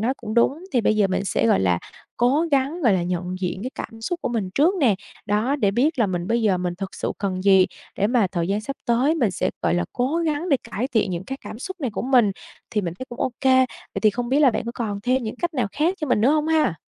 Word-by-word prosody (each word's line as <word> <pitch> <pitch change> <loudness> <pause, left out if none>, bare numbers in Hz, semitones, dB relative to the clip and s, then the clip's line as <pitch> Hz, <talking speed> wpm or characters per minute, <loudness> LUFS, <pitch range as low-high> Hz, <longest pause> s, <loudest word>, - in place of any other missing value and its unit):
nói 250 +5 +1
cũng 215 +1 -6
đúng, 280 +9 +2
thì 245 - +3
bây 215 0 +2
giờ 205 -2 +4
mình 190 +1 -1
sẽ, 115 - +1
gọi 95 - +4
là, 90 -2 +2 0.4
cố 275 +8 +2
gắng, 285 +5 +1
gọi 230 -7 +5
là, 180 -2 +1
nhận 180 +1 -3
diện 185 +2 -3
cái 255 - -4
cảm 225 - -7
xúc 345 +10 -3
của - - -1
mình 220 -6 -2
trước 330 +7 +4
nè, 235 -7 +4 0.3
đó, 220 +7 +1
để 205 -8 +2
biết 275 +7 +1
là 225 - +3
mình 175 -1 -3
bây 230 +1 +1
giờ 190 -4 +2
mình 180 -1 -2
thực 195 -1 -5
sự - - -3
cần 185 -2 -2
gì, 190 -2 +6 0.3
để 205 - +2
mà 235 -4 +3
thời 170 -1 -1
gian 205 +2 0
sắp 275 +5 -6
tới 255 +7 +3
mình 240 - +1
sẽ, - - -1
gọi - - +2
là, 175 - +1
cố 260 +6 0
gắng 330 +1 -1
để 280 - +4
cải 245 +6 -2
thiện 220 -7 +1
những 175 +1 -4
cái 270 +4 -6
cảm 220 - -8
xúc 375 +4 -7
này 255 -5 -1
của - - -4
mình, 245 -5 +4 0.4
thì 210 - 0
mình 170 -3 -4
thấy 260 - -5
cũng 240 - -9
ô 260 - +1
kê. 260 -1 +5 0.4
Vậy - - -2
thì 215 - +6
không 240 +3 -4
biết 280 +3 +3
là 275 -4 +6
bạn - - -3
có 235 - -4
còn 205 -4 -3
thêm 255 +1 +1
những 220 +1 -5
cách 345 +1 -2
nào 245 -6 +1
khác 325 +5 +1
cho 305 - -1
mình 245 - +2
nữa 245 +6 +4
hông 305 0 +2
ha? 310 - +2
235 Hz, 290 wpm, -23 LUFS, 195-275 Hz, 0.4 s, gì